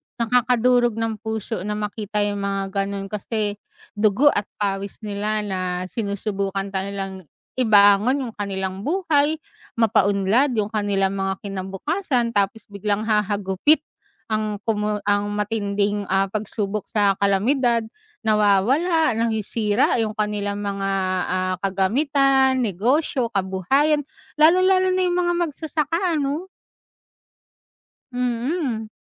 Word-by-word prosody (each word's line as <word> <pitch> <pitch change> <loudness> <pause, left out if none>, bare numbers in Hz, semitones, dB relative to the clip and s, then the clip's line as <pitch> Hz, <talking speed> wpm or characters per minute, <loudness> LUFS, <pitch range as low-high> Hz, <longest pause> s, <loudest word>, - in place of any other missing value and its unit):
Nakakadurog 245 0 +2
ng 225 -2 -2
puso 220 -1 -4
na 210 - -2
makita 210 0 -2
yung 205 0 -2
mga 195 -1 -2
gano'n 195 0 -3
kasi 210 0 -3 0.4
dugo 220 +8 +4
at 205 - -2
pawis 200 -1 -3
nila 210 +1 -2
na 190 -2 -3 0.3
sinusubukan 200 -2 -3
nga 190 0 -2
nilang 195 -3 -6 0.3
ibangon 215 +4 +5
yung 235 - -5
kanilang 190 -2 -4
buhay, 315 -4 +2 0.4
mapa-unlad 225 +3 +2
yung 215 0 -1
kanilang 195 -2 0
mga 195 0 -1
kinabukasan 230 - -2
tapos 205 +1 0
biglang 205 +1 -1
hahagupit 210 +6 +1 0.5
ang 215 -1 -1
pumu 210 -1 0
ang 205 0 +1
matinding 205 -1 -1 0.3
pagsubok 210 -1 -3
sa 205 -2 +3
kalamidad, 230 +4 +2 0.4
nawawala 225 - +3
nasisira 225 +1 +1
yung 215 0 -3
kanilang 205 -1 -1
mga, 195 -1 -2 0.4
ah, 185 0 0
kagamitan, 265 +7 +2
negosyo, 240 - 0
kabuhayan 230 - +1 0.4
lalong-lalo 370 +3 +5
na 370 - +1
yung 355 0 +1
mga 350 0 +1
magsasaka 320 +3 -1
ano? 295 +5 -2 1.7
Mhm. 245 -1 -2
215 Hz, 105 wpm, -22 LUFS, 200-250 Hz, 1.7 s, ibangon